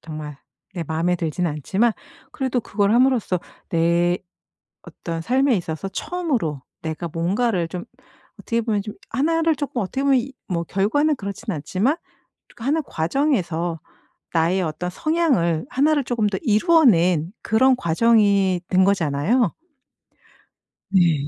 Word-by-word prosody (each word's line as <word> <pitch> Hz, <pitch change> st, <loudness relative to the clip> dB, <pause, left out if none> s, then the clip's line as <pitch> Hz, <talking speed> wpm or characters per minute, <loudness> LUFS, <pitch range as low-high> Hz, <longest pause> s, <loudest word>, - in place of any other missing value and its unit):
정말 155 Hz, -2 st, -7 dB, 0.4 s
내 170 Hz, -3 st, -3 dB
마음에 165 Hz, +3 st, 0 dB
들진 175 Hz, +1 st, -2 dB
않지만 190 Hz, -, +1 dB, 0.4 s
그래도 260 Hz, -3 st, -1 dB
그걸 205 Hz, -2 st, 0 dB
함으로써 240 Hz, -7 st, +2 dB, 0.3 s
내 170 Hz, +1 st, +2 dB, 0.7 s
어떤 165 Hz, -1 st, -6 dB
삶에 260 Hz, +6 st, +2 dB
있어서 165 Hz, +1 st, -4 dB
처음으로 230 Hz, -, -2 dB, 0.2 s
내가 160 Hz, +1 st, -4 dB
뭔가를 180 Hz, +3 st, 0 dB
좀 175 Hz, +1 st, -6 dB, 0.6 s
어떻게 230 Hz, -1 st, -1 dB
보면 215 Hz, -3 st, 0 dB
좀 210 Hz, +1 st, -8 dB
1 320 Hz, +7 st, +1 dB
를 325 Hz, -1 st, +2 dB
조금 275 Hz, -4 st, -3 dB
어떻게 265 Hz, +8 st, -3 dB
보면 275 Hz, -1 st, +4 dB
이 265 Hz, +3 st, -6 dB, 0.2 s
뭐 170 Hz, -1 st, 0 dB
결과는 225 Hz, -, +1 dB
그렇진 200 Hz, 0 st, -5 dB
않지만 185 Hz, -, 0 dB, 0.6 s
그 225 Hz, -, -11 dB
하는 295 Hz, +5 st, +1 dB
과정에서 175 Hz, -, -1 dB, 0.5 s
나의 170 Hz, +3 st, +2 dB
어떤 165 Hz, +2 st, -3 dB
성향을 245 Hz, -, +1 dB
1 290 Hz, +4 st, +2 dB
를 290 Hz, -2 st, +1 dB
조금 240 Hz, -3 st, -1 dB
더 200 Hz, -2 st, -2 dB
이루어 320 Hz, -, +4 dB
낸 175 Hz, -, +3 dB
그런 255 Hz, +4 st, +4 dB
과정이 200 Hz, -1 st, +3 dB
된 185 Hz, 0 st, +4 dB
거잖아요. 195 Hz, -, +1 dB, 1.4 s
네. 170 Hz, -7 st, +3 dB
195 Hz, 270 characters per minute, -22 LUFS, 170-255 Hz, 1.4 s, 보면